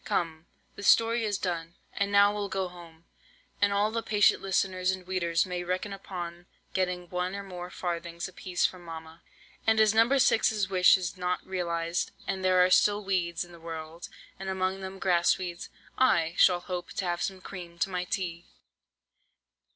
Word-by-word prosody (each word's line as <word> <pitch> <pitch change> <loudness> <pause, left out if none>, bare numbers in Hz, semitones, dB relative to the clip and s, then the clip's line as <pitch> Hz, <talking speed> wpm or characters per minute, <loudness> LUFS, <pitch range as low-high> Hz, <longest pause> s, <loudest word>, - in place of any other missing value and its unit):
Come, 165 -1 -2 0.3
the - - -10
story 230 +3 +4
is 205 -2 0
done, 170 -3 -3 0.2
and 200 0 -1
now 200 0 +6
we'll 205 -1 -3
go 190 -1 -2
home, 170 -2 -14 0.6
and 205 0 +4
all 205 +2 +2
the 230 +1 -1
patient 210 -2 +3
listeners 185 -1 0
and 185 -1 -2
weeders 170 -3 +1
may 180 -1 -4
reckon 185 +3 -2
upon 175 -2 -7 0.3
getting 180 -1 -1
one 180 +1 -2
or 200 - -5
more 180 -2 -7
farthings 170 -1 -4
apiece 185 0 -1
from 185 -1 -2
mamma. 165 0 -9 0.5
And 220 0 +4
as 215 -1 +5
No. 225 +1 +5
6's 220 -6 +3
wish 185 0 +6
is 185 0 -4
not 180 0 -2
realized, 170 -2 -2
and 190 -1 -3
there 185 -1 +5
are 185 - 0
still 205 +3 +4
weeds 175 -3 -1
in 175 - -17
the 170 - -13
world, 165 0 -7 0.3
and 190 0 -5
among 190 0 -1
them 190 0 -6
Grass 175 -2 +3
weeds, 175 -2 -6 0.3
I 170 -11 +3
shall 180 -2 +5
hope 180 -1 -5
to 190 - -2
have 175 -1 -1
some 190 -3 -2
cream 175 -2 -9
to 180 - 0
my 180 0 -2
tea." 175 -2 -4
185 Hz, 180 wpm, -28 LUFS, 175-195 Hz, 0.6 s, now